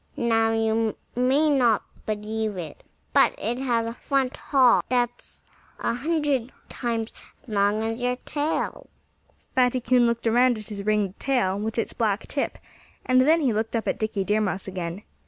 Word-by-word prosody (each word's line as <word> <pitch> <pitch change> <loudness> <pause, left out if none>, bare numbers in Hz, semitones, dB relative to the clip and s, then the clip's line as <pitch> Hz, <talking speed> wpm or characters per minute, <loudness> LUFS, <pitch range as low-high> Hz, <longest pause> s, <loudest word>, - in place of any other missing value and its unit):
Now, 225 -1 +2
you 225 0 0 0.2
may 260 +5 +3
not 240 -6 +3 0.2
believe 215 -1 -2
it, 165 -4 -7 0.3
but - - +4
it 235 +4 -2
has 240 -4 0
a 230 - -4
front 270 +1 -1
hall 260 -4 +4
that's 245 -1 -2 0.4
a - - 0
hundred 280 -2 0 0.2
times 230 -2 -3 0.3
as - - -27
long 205 +1 +1
as 225 +2 -3
your 250 0 +1
tail." 295 +2 -2 0.6
Fatty 255 0 +3
Coon 245 0 +3
looked 235 0 -1
around 240 +1 +4
at 215 0 -10
his 205 -2 -5
ringed 210 -3 0
tail, 240 -8 +1
with 220 +2 -3
its 230 - -1
black 215 -2 0
tip; 280 - -2 0.5
and 255 0 +4
then 320 +5 +4
he 260 -6 +2
looked 220 +2 -2
up 225 - -2
at - - -1
Dickie 215 -2 -1
Deer 210 +2 +1
Mouse 195 -2 -2
again. 180 +1 -5
230 Hz, 170 wpm, -25 LUFS, 215-255 Hz, 0.6 s, but